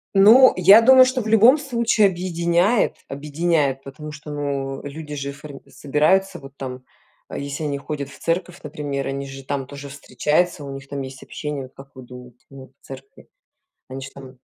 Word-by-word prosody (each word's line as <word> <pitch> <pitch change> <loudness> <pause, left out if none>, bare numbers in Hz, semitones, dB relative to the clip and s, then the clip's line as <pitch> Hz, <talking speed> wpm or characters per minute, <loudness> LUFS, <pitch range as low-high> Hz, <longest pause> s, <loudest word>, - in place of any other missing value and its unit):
Ну, 225 +7 +7
я 195 +5 +7
думаю, 260 +2 +7
что 255 0 -1
в 220 - -6
любом 225 +6 +6
случае 235 -6 +2
объединяет 175 +3 0
объединяет, 145 -1 -1
потому 145 +3 -9
что, 150 0 -10
ну, 140 -2 -4
люди 150 +1 -8
же 140 0 -4
форми 140 0 -12
собираются 175 +6 0
вот 135 -1 -14
там, 130 -1 -7 0.4
а, - - -7
если 140 +2 -5
они 145 -1 -2
ходят 140 0 -6
в 140 - -14
церковь, 175 +2 -3
например, 145 -2 -4
они 140 0 -4
же 135 0 -10
там 135 -1 -4
тоже 140 0 -9
встречаются, 150 +4 -1
у 140 -1 -7
них 135 0 -10
там 140 -1 -5
есть 130 0 -9
общение, 150 -2 -6
вот 130 - -13
как 135 0 -14
вы 130 - -12
думаете, 125 0 -14
ну, 135 -1 -14
в - - -23
церкви? 135 0 -13 0.6
Они 135 +1 -7
ж 135 - -8
там 130 -2 -12
145 Hz, 185 wpm, -21 LUFS, 135-175 Hz, 0.6 s, Ну